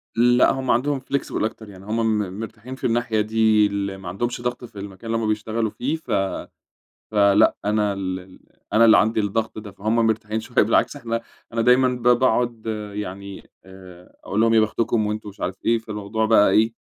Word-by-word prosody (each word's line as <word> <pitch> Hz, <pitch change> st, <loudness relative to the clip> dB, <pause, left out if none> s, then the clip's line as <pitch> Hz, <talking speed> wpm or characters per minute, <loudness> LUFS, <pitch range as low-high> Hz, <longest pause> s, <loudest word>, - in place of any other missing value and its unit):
لأ، 120 Hz, +1 st, +4 dB
همّ 130 Hz, -1 st, -1 dB
عندهم 135 Hz, +3 st, +1 dB
flexible 135 Hz, -3 st, -3 dB
أكتر 110 Hz, -1 st, -4 dB
يعني، 95 Hz, 0 st, -13 dB
همّ 110 Hz, 0 st, 0 dB
م 100 Hz, 0 st, -4 dB
مرتاحين 115 Hz, +3 st, -8 dB
في -, -, -19 dB
الناحية 115 Hz, -2 st, 0 dB
دي، 110 Hz, 0 st, +3 dB
ال 100 Hz, -1 st, -3 dB
ما 95 Hz, -2 st, -8 dB
عندهمش 120 Hz, +6 st, -3 dB
ضغط 120 Hz, 0 st, -3 dB
في 105 Hz, -4 st, -12 dB
المكان 100 Hz, +3 st, -7 dB
اللي 115 Hz, -, 0 dB
همّ 110 Hz, -, 0 dB
بيشتغلوا 110 Hz, 0 st, -1 dB
فيه، 140 Hz, +5 st, -2 dB
ف 160 Hz, -7 st, -9 dB, 1.0 s
فلأ 100 Hz, 0 st, +4 dB
أنا 105 Hz, -1 st, +1 dB
ال 95 Hz, -1 st, -6 dB, 0.3 s
أنا 115 Hz, +2 st, +5 dB
اللي 115 Hz, -, +7 dB
عندي 110 Hz, +1 st, +2 dB
الضغط 110 Hz, +2 st, -2 dB
ده، 105 Hz, -1 st, -8 dB
فهمّ 105 Hz, +4 st, -2 dB
مرتاحين 110 Hz, 0 st, -1 dB
شويّة، -, -, +1 dB
بالعكس -, -, +1 dB
إحنا 115 Hz, -1 st, -3 dB, 0.3 s
أنا 115 Hz, 0 st, 0 dB
دايمًا 125 Hz, +2 st, +5 dB
ب 125 Hz, -1 st, -4 dB
باقعد 120 Hz, -2 st, +2 dB, 0.3 s
يعني 100 Hz, -1 st, -7 dB
آآ، 95 Hz, -2 st, -15 dB
أقول 105 Hz, +3 st, -1 dB
لهم 115 Hz, 0 st, +4 dB
يا 110 Hz, -, +6 dB
بختكم 110 Hz, 0 st, 0 dB
وأنتم 105 Hz, 0 st, -4 dB
مش 100 Hz, -, -13 dB
عارف 90 Hz, -, -2 dB
إيه، 115 Hz, 0 st, +3 dB
فالموضوع 110 Hz, 0 st, -3 dB
بقى 110 Hz, -2 st, +5 dB
إيه، 110 Hz, +1 st, +3 dB
110 Hz, 190 wpm, -22 LUFS, 100-115 Hz, 1.0 s, اللي